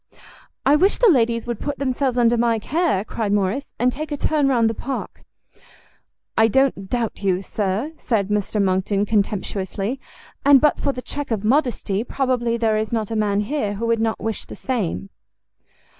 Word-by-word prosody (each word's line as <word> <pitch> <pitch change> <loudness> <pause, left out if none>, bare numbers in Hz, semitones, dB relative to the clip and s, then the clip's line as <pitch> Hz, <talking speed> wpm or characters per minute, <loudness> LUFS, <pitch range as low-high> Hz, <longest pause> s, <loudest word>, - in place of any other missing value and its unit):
"I 280 +2 +5
wish 380 +7 +3
the 470 -5 +6
ladies 230 -4 +2
would 240 -3 -4
put 290 -1 -3
themselves 260 -1 -1
under 240 -1 +4
my 230 -1 +2
care," 220 - 0
cried 215 -3 -2
Morrice, 205 +7 0
"and 250 +1 +2
take 305 +3 -6
a 290 - -2
turn 295 -1 +1
round 240 -4 +3
the 225 - 0
park." 270 +4 -5 1.1
"I 225 - +5
don't 235 -5 +1
doubt 235 -4 -2
you, 190 -1 0
Sir," 205 +9 -2
said 210 -5 -1
Mr 210 0 -1
Monckton, 195 +1 +1
contemptuously, 205 +2 -1 0.4
"and, 280 -1 +7
but 300 +1 +2
for 280 - 0
the 250 -2 -7
check 290 -1 -5
of 220 -4 -1
modesty, 230 -5 +1
probably 245 -2 0
there 220 -2 +1
is 215 0 -2
not 225 -2 -2
a - - -1
man 205 -1 +1
here 210 -3 -2
who 225 +4 -3
would 230 -1 +1
not 225 -1 0
wish 225 -1 -3
the - - -9
same." 205 -6 -3
230 Hz, 180 wpm, -22 LUFS, 205-265 Hz, 1.1 s, and